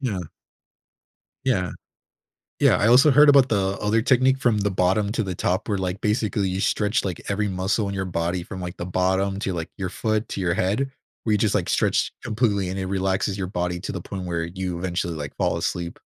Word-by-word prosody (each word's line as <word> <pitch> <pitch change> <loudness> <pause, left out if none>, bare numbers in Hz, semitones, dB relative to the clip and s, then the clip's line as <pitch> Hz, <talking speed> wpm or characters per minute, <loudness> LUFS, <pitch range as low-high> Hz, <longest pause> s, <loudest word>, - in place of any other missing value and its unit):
Yeah. 110 -9 -2 1.2
Yeah. 95 -9 +1 0.9
Yeah. - - +5
I 105 - +2
also 130 +5 +7
heard 150 +2 +7
about 140 -2 +6
the 100 -2 0
other 105 +2 +2
technique 130 +2 +3
from 120 -5 +2
the 100 0 0
bottom 95 +3 +1
to 115 - 0
the 95 -2 -3
top 95 +5 -1
where, 100 -2 0
like, 95 0 -3
basically, 105 -2 0
you 95 +1 -2
stretch, 105 +2 +1
like, 90 -4 -3
every 105 +1 0
muscle 95 +3 0
in 100 - -4
your 95 - -2
body 85 0 -2
from, 95 +1 -8
like, 90 +1 -6
the 85 - -5
bottom 95 +2 0
to, 95 - -2
like, 85 -2 -4
your 95 -2 -3
foot 110 +3 -1
to - - -3
your 85 -2 +1
head 105 +10 0 0.3
where 110 - +1
you 105 - +3
just, 105 -1 +1
like, 90 -4 0
stretch - - +1
completely, 110 -5 0
and 95 +1 -4
it 95 - -2
relaxes 95 +1 -1
your 95 - -2
body 90 -1 -2
to - - -5
the - - -4
point 95 -2 -6
where 85 -1 -1
you 90 0 -4
eventually, 85 -1 -2
like, 75 -3 -6
fall - - +1
asleep. 85 -1 -3
95 Hz, 215 wpm, -24 LUFS, 90-105 Hz, 1.2 s, also